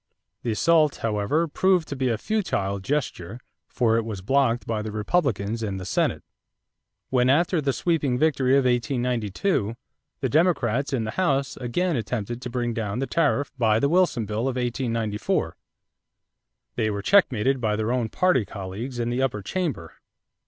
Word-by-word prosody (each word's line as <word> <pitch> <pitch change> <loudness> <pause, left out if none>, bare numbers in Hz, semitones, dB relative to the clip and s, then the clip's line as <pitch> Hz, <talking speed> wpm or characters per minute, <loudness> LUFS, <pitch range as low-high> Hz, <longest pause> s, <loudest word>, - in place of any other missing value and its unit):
The 120 - -3
assault, 155 +4 +3
however, 115 +10 +1
proved 180 +1 +2
to 140 - -3
be 130 -1 0
a 115 - 0
futile 105 - -1
gesture 115 - -3 0.3
for 115 -3 +1
it 115 - +1
was 105 -4 -6
blocked 125 0 +2
by 110 -2 -2
the 110 0 -5
Republicans 110 - 0
in 100 -3 -3
the 95 - -6
Senate. - - 0 0.9
When, 125 -1 +3
after 165 +4 +3
the 140 -1 +1
sweeping 145 -4 0
victory 135 -3 +2
of 135 -1 +4
1892, 120 - 0 0.4
the 135 - 0
Democrats 140 -4 +1
in 130 -5 0
the 110 - -3
House 140 -5 0
again 160 +8 -1
attempted 120 0 -3
to 125 - -5
bring 120 -1 -2
down 110 -2 -3
the 135 - -1
tariff 145 -2 +1
by 110 -2 +3
the 140 - +2
Wilson 170 -9 +2
bill 110 +4 -2
of 130 - -1
1894, 115 -4 -1 1.2
they 110 -2 0
were 100 -1 -3
checkmated 135 - +3
by 110 -2 +1
their 110 +2 -1
own 125 -3 0
party 180 -7 +2
colleagues 100 +6 -6
in 120 0 -1
the 125 +2 0
upper 115 -6 -1
chamber. 145 - -3
125 Hz, 165 wpm, -25 LUFS, 110-140 Hz, 1.2 s, of